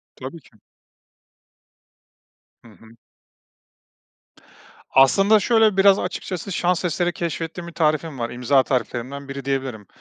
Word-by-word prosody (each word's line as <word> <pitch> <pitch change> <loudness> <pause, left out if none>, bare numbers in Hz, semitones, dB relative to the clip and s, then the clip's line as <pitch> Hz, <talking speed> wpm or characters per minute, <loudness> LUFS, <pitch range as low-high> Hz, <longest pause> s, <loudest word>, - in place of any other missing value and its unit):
Tabii - - -8
ki. - - -24 2.1
Hı - - -16
hı. 105 +3 -19 2.0
Aslında, 195 +11 +5
şöyle, 220 -2 +3
biraz 195 0 +5
açıkçası 185 +1 -5
şans 180 0 0
eseri 175 +1 -1
keşfettiğim 170 +1 -5
bir 170 - -10
tarifim 155 -3 0
var, 115 - -2
imza 130 +2 +2
tariflerimden 130 +3 -3
biri 135 -1 -7
diyebilirim. 130 -7 -3
155 Hz, 110 wpm, -22 LUFS, 130-180 Hz, 2.1 s, Aslında